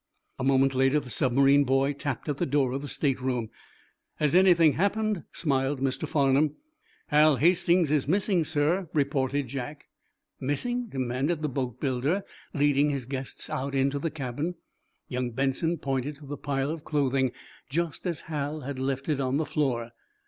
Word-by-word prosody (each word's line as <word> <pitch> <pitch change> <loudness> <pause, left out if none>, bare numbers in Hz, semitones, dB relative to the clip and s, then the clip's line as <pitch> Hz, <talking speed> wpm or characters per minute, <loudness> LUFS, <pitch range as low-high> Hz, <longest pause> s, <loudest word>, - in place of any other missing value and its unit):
A - - -2
moment 135 0 +3
later 135 +3 +3
the 125 -4 -9
submarine 135 +4 +4
boy 135 +1 +2
tapped 140 0 -4
at 145 -2 -1
the - - 0
door 135 -2 +2
of 135 +2 -3
the 145 - -6
state 135 -3 -1
room. 125 -4 -2 0.6
"Has 150 -1 +1
anything 175 -4 +6
happened?" 205 +3 0
smiled 135 -3 0
Mr. 135 +3 -1
Farnum. 145 +1 +2 0.5
"Hal 150 0 +5
Hastings 170 +1 +3
is 145 -3 +1
missing, 190 0 +2
sir," 155 +4 0
reported 140 -1 0
Jack. 140 +3 -6 0.5
"Missing?" 240 - -1
demanded 135 - -2
the 150 - 0
boatbuilder, 130 - -1 0.3
leading 145 -1 +3
his 140 -4 -2
guests 130 0 -5
out 140 +1 -3
into 135 +1 +1
the 165 - -1
cabin. 150 +3 -4 0.5
Young 125 -1 -2
Benson 140 +7 0
pointed 135 0 -2
to 145 +1 -14
the 145 +1 -5
pile 140 0 -2
of 160 -2 -6
clothing, 135 -3 +1 0.4
just 170 +3 -2
as 170 -4 -2
Hal 150 -1 -4
had 140 -1 -5
left 135 0 -2
it 150 -3 0
on 130 0 0
the 155 - 0
floor. 120 -7 -1
140 Hz, 165 wpm, -27 LUFS, 135-155 Hz, 0.6 s, anything